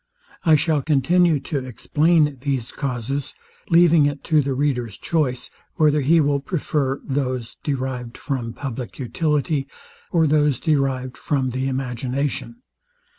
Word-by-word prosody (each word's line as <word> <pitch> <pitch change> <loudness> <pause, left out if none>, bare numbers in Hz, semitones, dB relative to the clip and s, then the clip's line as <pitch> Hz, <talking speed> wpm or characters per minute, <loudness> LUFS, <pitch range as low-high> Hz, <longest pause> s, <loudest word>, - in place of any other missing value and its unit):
I 160 -3 +6
shall 150 0 +1
continue 160 +3 +3
to 145 - -2
explain 150 +4 +1
these 135 -4 -2
causes, 135 +1 -3 0.3
leaving 170 -3 +5
it 145 - -4
to 155 -2 +3
the 135 -1 -2
reader's 125 -6 -1
choice, 140 -7 -1 0.2
whether 150 -2 +3
he 160 +5 +4
will 145 -2 +2
prefer 140 -5 -1
those 130 -4 -3
derived 130 -4 -3
from 125 -5 -3
publick 130 -3 -6
utility, 145 +2 -1 0.4
or 165 -2 +3
those 150 -3 +2
derived 135 -4 0
from 135 -4 0
the 130 +2 -2
imagination. 135 - -3
140 Hz, 125 wpm, -22 LUFS, 130-150 Hz, 0.4 s, I